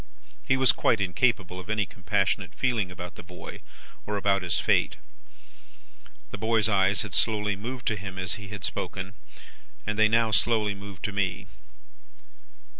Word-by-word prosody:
He 130 - +2
was 130 -1 +6
quite 110 - +2
incapable 95 -1 +1
of 95 - -10
any 105 -1 +1
compassionate - - -1
feeling 115 -8 0
about 90 0 -7
the - - -10
boy, 90 0 -10 0.5
or 105 0 -1
about 100 -1 +2
his 90 -2 0
fate. - - +2 1.4
"The - - -6
boy's 110 0 +2
eyes 100 -1 +3
had 105 -4 -7
slowly 105 +1 +2
moved 120 +5 -6
to 110 - 0
him 95 -2 -7
as 95 -1 -1
he 100 -1 -7
had 100 -2 -7
spoken, 95 +2 -3 0.7
and 105 0 -2
they 110 - +7
now 115 0 +3
slowly 105 +1 +2
moved 100 -1 -10
to 105 - -1
me. 100 0 -1
100 Hz, 160 wpm, -27 LUFS, 95-110 Hz, 1.4 s, they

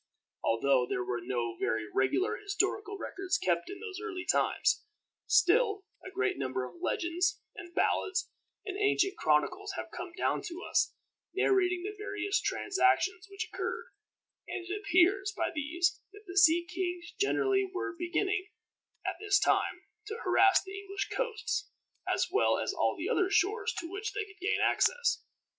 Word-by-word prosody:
Although 125 +2 +3
there 125 - -1
were 120 0 -2
no 120 -1 -2
very 110 -1 0
regular 130 - +2
historical 410 0 -1
records 390 -1 -2
kept 170 -1 0
in 390 - -7
those 405 -3 -6
early 370 -5 -4
times, 425 - +2 0.4
still 415 -2 +4 0.2
a - - -7
great 385 0 -1
number 130 0 -2
of 170 +6 -15
legends, 355 +1 0 0.2
and 345 0 -10
ballads, 375 -1 +1 0.4
and 390 - -4
ancient 395 -2 +2
chronicles 360 - +1
have - - -5
come 350 - -5
down - - +1
to 350 +1 -7
us, - - +1 0.4
narrating 365 -2 +2
the 415 +2 -4
various 405 -1 -1
transactions 385 -1 +1
which 395 0 -4
occurred, - - -3 0.6
and 355 - -5
it 370 - -2
appears 390 +2 +3
by - - 0
these 340 +4 0
that 415 +1 -13
the 365 -1 -8
sea 345 -2 +6
kings 350 -1 -4
generally 395 -1 +2
were 385 0 -3
beginning, 360 +2 -1 0.6
at - - -2
this 405 -2 +3
time, - - +1 0.2
to 435 +1 -4
harass 380 +1 +5
the 390 0 -7
English 395 0 -4
coasts, 440 -3 -2 0.4
as - - +1
well 405 - +3
as - - -1
all - - +1
the - - -3
other 370 0 +2
shores 415 +3 +2
to 335 - -3
which 400 +4 -4
they 415 +1 -2
could 410 0 -17
gain 380 - +1
access. 480 -2 +2
380 Hz, 160 wpm, -31 LUFS, 350-405 Hz, 0.6 s, sea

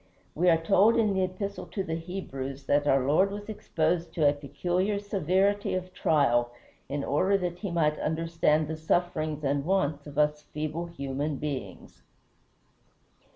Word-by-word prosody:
We 175 +3 +3
are 165 - +5
told 195 +7 +4
in 215 -3 +3
the 190 - +1
Epistle 195 +2 -4
to 195 - -3
the 160 - -4
Hebrews 140 -6 -5
that 145 0 +1
our 135 -2 +3
Lord 160 +8 +3
was 205 +1 -7
exposed 170 -6 -1
to 155 -3 +4
a 145 - +4
peculiar 175 +8 -1
severity 200 0 +1
of 185 0 -4
trial 135 -8 +2 0.4
in 140 0 -2
order 190 +7 +2
that 180 -2 -3
he 200 - -3
might 155 -3 +1
understand 160 -1 +1
the 160 +1 -4
sufferings 155 -2 -1
and 140 0 0
wants 155 -5 0
of 145 0 -10
us 150 0 +2
feeble 155 +3 -4
human 145 -2 -3
beings. 140 -1 -6
165 Hz, 155 wpm, -28 LUFS, 145-185 Hz, 0.4 s, are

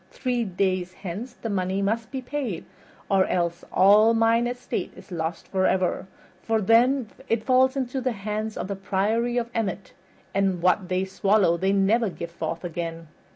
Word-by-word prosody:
Three 250 -2 -1
days 185 -2 -1
hence 200 +9 -6
the 230 - -6
money 190 0 -1
must 220 +3 -1
be 260 0 -5
paid 250 - -4 0.4
or 195 -1 +3
else 170 -1 -1
all 210 +4 +6
mine 230 +1 +3
estate 245 0 -4
is 185 +1 -15
lost 165 -1 -4
forever, 190 -1 +1 0.3
for 225 +2 +1
then 230 +3 +3 0.2
it 225 -1 +1
falls 260 +1 +4
into 260 0 -2
the 255 -1 0
hands 215 +1 -4
of - - -3
the 200 - -3
Priory 210 +5 0
of 235 0 -1
Emmet, 200 -4 -3 0.4
and 195 -2 +1
what 180 +1 +2
they 185 +1 0
swallow 195 -2 +2
they 190 +3 +1
never 200 +3 +3
give 170 -2 -7
forth 165 0 -4
again." 165 -1 -5
200 Hz, 165 wpm, -25 LUFS, 185-230 Hz, 0.4 s, all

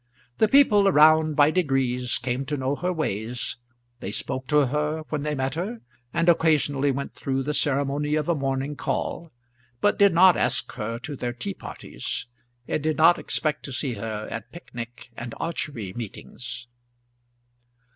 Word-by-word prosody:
The 220 - +5
people 210 -6 +5
around 155 -2 +5
by 145 +1 +5
degrees 135 -7 0
came 125 +1 -2
to 145 0 -2
know 135 +1 -1
her 180 +4 -1
ways, 120 - -3 0.4
they 95 - -5
spoke 130 +4 -3
to 150 -1 +4
her 150 +4 -1
when 150 -2 -2
they 150 0 -1
met 135 0 -1
her, 200 +9 -4 0.3
and 170 +3 0
occasionally 150 -4 +3
went 140 +1 -3
through 135 0 -2
the 150 +2 -2
ceremony 145 +1 +1
of 155 -1 -1
a 170 - +3
morning 135 0 -2
call; 170 +3 -3 0.5
but 205 - +2
did 200 -1 +7
not 185 +1 +7
ask - - +1
her 115 0 -4
to 140 +5 -6
their 120 -2 -3
tea 120 -5 -4
parties, - - -6 0.4
and - - -1
did 155 +1 0
not 165 +2 +6
expect 150 -1 -1
to 140 - -6
see 130 0 -2
her 110 0 -5
at 115 +1 -6
picnic 120 -7 -9
and 120 0 -6
archery 140 - -3
meetings. 120 +1 -7
145 Hz, 165 wpm, -25 LUFS, 125-155 Hz, 0.5 s, did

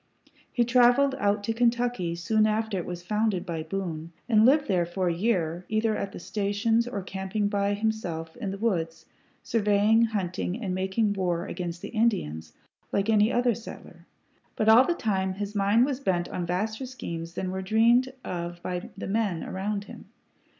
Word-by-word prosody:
He 240 - +2
traveled 245 +3 +4
out 205 0 +1
to 225 - -1
Kentucky 235 -6 +1
soon 215 +5 +2
after 220 0 -1
it 170 - -6
was 175 -1 -6
founded 210 0 0
by 165 -2 -3
Boone, 165 -1 -4 0.2
and 220 -1 +5
lived 290 +2 +4
there 185 -4 +2
for 180 +1 -1
a - - +1
year, 175 -3 0
either 220 0 +1
at 195 - -3
the - - -9
stations 210 +5 0
or 205 -6 -4
camping 190 +2 -2
by 205 0 0
him 220 +2 +1
self 165 -7 -6
in 220 -5 -4
the 195 - -4
woods, 165 -7 -1 0.4
surveying, 215 +1 +3
hunting, 190 -2 -2
and 195 -6 -3
making 190 +3 0
war 180 -3 -1
against 175 -3 -5
the - - -5
Indians 80 - -1 0.4
like 200 +2 +1
any 215 +1 +4
other 245 0 +2
settler; 225 +1 -11 0.5
but 215 - 0
all 230 +4 +8
the 345 - 0
time 190 - -1
his 205 +1 -4
mind 205 +4 +3
was 275 -2 -2
bent 180 -9 0
on 175 -1 -3
vaster 215 +8 -2
schemes 170 -9 -6
than 185 +1 -3
were 190 0 -3
dreamed 235 +6 +3
of 175 -1 -5
by 180 0 -4
the - - -5
men 200 -5 -1
around 200 +2 -3
him. - - -12
205 Hz, 180 wpm, -27 LUFS, 180-225 Hz, 0.5 s, all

